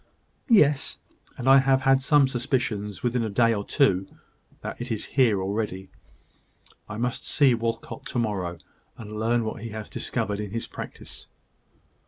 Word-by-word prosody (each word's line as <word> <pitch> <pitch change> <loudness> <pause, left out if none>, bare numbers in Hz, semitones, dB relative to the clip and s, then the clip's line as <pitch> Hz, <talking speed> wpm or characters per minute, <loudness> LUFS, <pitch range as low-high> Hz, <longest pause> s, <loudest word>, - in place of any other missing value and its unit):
"Yes: 150 - +4 0.4
and 125 - -4
I 135 +1 +8
have 135 0 +3
had 135 0 +4
some 140 0 +4
suspicions, 120 -5 -2
within 120 0 +1
a 110 - -2
day 115 +3 +3
or 100 -2 -2
two, 95 -7 +2 0.5
that - - -6
it 120 0 -5
is 110 - -2
here 120 -7 +4
already. 95 -1 -3 1.0
I 105 - -5
must 120 +1 -2
see 140 -4 +4
Walcot 115 0 -3
to - - -4
morrow; 95 -7 -1 0.4
and 105 -1 -7
learn 115 +1 +1
what 110 - -5
he 115 - -5
has 110 -1 -7
discovered 105 -4 -2
in 105 -1 -4
his 115 +3 -3
practice." - - -9
115 Hz, 160 wpm, -26 LUFS, 105-130 Hz, 1.0 s, I